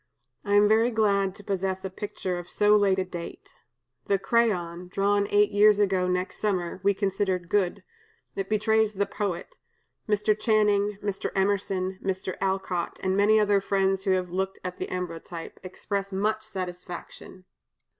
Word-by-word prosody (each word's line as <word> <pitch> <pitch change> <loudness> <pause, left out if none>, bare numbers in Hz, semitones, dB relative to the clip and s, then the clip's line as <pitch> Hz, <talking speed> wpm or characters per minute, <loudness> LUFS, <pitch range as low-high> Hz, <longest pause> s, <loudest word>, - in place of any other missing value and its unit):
I 205 0 +1
am 205 0 +6
very 220 +3 +4
glad 200 -4 +1
to 205 - -13
possess 190 -1 -2
a - - -2
picture 185 -2 -4
of 175 - -10
so 210 0 +4
late 200 -2 +3
a 190 - 0
date. 175 -2 -8 0.5
The 200 - +3
crayon, 185 -5 0
drawn 200 +2 +1
eight 205 0 +4
years 210 0 +5
ago 190 -3 +2
next 180 +1 -2
summer, 185 -4 -1
we 200 +1 +2
considered 190 -3 -1
good; 200 -1 0 0.5
it 195 0 -3
betrays 220 0 +2
the 200 0 0
poet. 205 - -4 0.5
Mr. 210 0 +2
Channing, 210 -2 +2
Mr. 200 -2 -2
Emerson, 190 -1 0
Mr. 190 -1 -2
Alcott, 190 -2 -1
and 190 0 +1
many 210 +2 +4
other 205 -1 +3
friends 195 -1 0
who 195 - +2
have 180 -1 -1
looked 190 +1 -2
at 180 0 -6
the - - -3
ambrotype, 170 -2 -6
express 195 +2 -4
much 210 +3 0
satisfaction.'" 185 -2 -8
195 Hz, 155 wpm, -26 LUFS, 185-205 Hz, 0.5 s, am